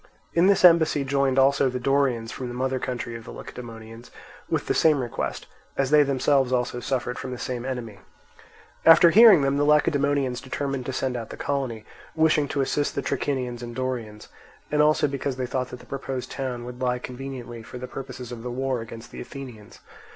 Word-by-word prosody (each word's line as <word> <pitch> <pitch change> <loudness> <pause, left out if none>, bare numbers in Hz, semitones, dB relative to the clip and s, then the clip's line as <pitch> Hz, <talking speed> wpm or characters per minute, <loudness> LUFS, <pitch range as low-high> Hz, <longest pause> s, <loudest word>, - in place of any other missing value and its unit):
In 170 +2 +4
this 195 -2 +5
embassy 160 -4 +5
joined 135 -1 +1
also 135 0 +4
the 125 0 -3
Dorians 125 -4 +1
from 130 - -5
the 120 - -6
mother 130 +1 -1
country 120 -2 -4
of 115 - -8
the - - -12
Lacedaemonians, 115 -1 -10 0.4
with - - -1
the - - 0
same 155 -3 +4
request, 120 -2 -4 0.3
as 135 0 0
they 150 0 +7
themselves 135 -1 +2
also 125 -1 0
suffered 125 -1 -2
from 130 - -5
the 125 - -5
same 120 -1 -4
enemy. 120 -6 -5 0.8
After 165 +1 +8
hearing 210 -6 +8
them, 135 +1 +1
the 145 - +2
Lacedaemonians 145 -3 +2
determined 135 -1 -4
to - - -1
send 130 0 -2
out 115 -2 -5
the - - -8
colony, 130 -6 -3 0.3
wishing 155 -2 +3
to 140 - -1
assist 145 +2 -1
the 140 - -2
Trachinians 125 -4 -2
and 120 -1 -7
Dorians, 120 -5 -4 0.4
and 150 0 +3
also 150 0 +4
because 140 -1 -3
they 130 0 -2
thought 130 0 -2
that 125 - -9
the - - -15
proposed 135 -2 -5
town 125 -3 -4
would 125 +1 -9
lie 125 -1 +1
conveniently 125 -2 -7
for 115 - -10
the 125 - -6
purposes 125 -2 -8
of 120 -2 -7
the 125 - -5
war 130 0 -2
against 115 0 -10
the - - -8
Athenians. 125 -6 -10
130 Hz, 195 wpm, -25 LUFS, 120-140 Hz, 0.8 s, After